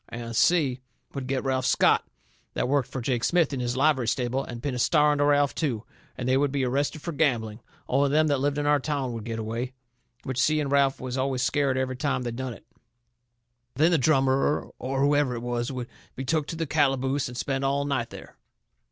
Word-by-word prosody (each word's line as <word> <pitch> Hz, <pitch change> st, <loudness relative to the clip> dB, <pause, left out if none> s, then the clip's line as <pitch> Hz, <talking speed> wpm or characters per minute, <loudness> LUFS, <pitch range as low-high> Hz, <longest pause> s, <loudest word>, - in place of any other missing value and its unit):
And 115 Hz, -1 st, -6 dB
Si 140 Hz, -4 st, +3 dB, 0.3 s
would 135 Hz, -2 st, -5 dB
get 135 Hz, -1 st, -1 dB
Ralph 130 Hz, -1 st, 0 dB
Scott, -, -, +4 dB, 0.5 s
that -, -, 0 dB
worked 140 Hz, -1 st, +1 dB
fur 130 Hz, -, -5 dB
Jake 120 Hz, -1 st, -1 dB
Smith 170 Hz, -4 st, +2 dB
in 135 Hz, -, -2 dB
his 120 Hz, 0 st, -2 dB
livery 135 Hz, -4 st, +2 dB
stable, 125 Hz, +2 st, 0 dB
and 120 Hz, 0 st, -8 dB
pin 145 Hz, -3 st, -1 dB
a 125 Hz, -, -3 dB
star 150 Hz, +3 st, +4 dB
onto 145 Hz, 0 st, +2 dB
Ralph, 145 Hz, -1 st, +3 dB
too. 125 Hz, -9 st, -2 dB, 0.3 s
And 125 Hz, -, -3 dB
they 130 Hz, +1 st, +3 dB
would 140 Hz, 0 st, +1 dB
be 135 Hz, -2 st, 0 dB
arrested 140 Hz, +4 st, -1 dB
fur 170 Hz, -, -3 dB
gambling, 120 Hz, -8 st, 0 dB, 0.3 s
only 140 Hz, +2 st, +2 dB
them 155 Hz, +2 st, +3 dB
that 145 Hz, -3 st, +1 dB
lived 145 Hz, +1 st, 0 dB
in 145 Hz, -, -1 dB
our 145 Hz, 0 st, +4 dB
town 140 Hz, -3 st, -2 dB
would 115 Hz, -2 st, -6 dB
get 115 Hz, -1 st, -4 dB
away. 115 Hz, +3 st, -4 dB, 0.5 s
Which 130 Hz, -1 st, -3 dB
Si 155 Hz, 0 st, +3 dB
and 140 Hz, -2 st, -2 dB
Ralph 140 Hz, -1 st, +3 dB
was 130 Hz, 0 st, -4 dB
always 130 Hz, -1 st, 0 dB
scared 140 Hz, -1 st, +1 dB
every 130 Hz, -1 st, -2 dB
time 140 Hz, -2 st, -1 dB
they 120 Hz, -, -3 dB
done 130 Hz, +1 st, -4 dB
it. -, -, -18 dB, 1.1 s
Then 160 Hz, +4 st, +4 dB
the 165 Hz, -, +3 dB
drummer, 135 Hz, 0 st, +2 dB
or 135 Hz, +2 st, -2 dB
whoever 145 Hz, -2 st, +2 dB
it 115 Hz, -, -6 dB
was, 120 Hz, +1 st, -2 dB
would 125 Hz, -2 st, -5 dB, 0.3 s
be 135 Hz, -, -5 dB
took 155 Hz, +1 st, 0 dB
to -, -, -5 dB
the 165 Hz, 0 st, -2 dB
calaboose, 135 Hz, -2 st, +1 dB
and 125 Hz, -1 st, -8 dB
spend 135 Hz, +1 st, -2 dB
all 140 Hz, +1 st, +1 dB
night 135 Hz, -5 st, -1 dB
there. -, -, -11 dB
135 Hz, 220 wpm, -26 LUFS, 125-145 Hz, 1.1 s, Scott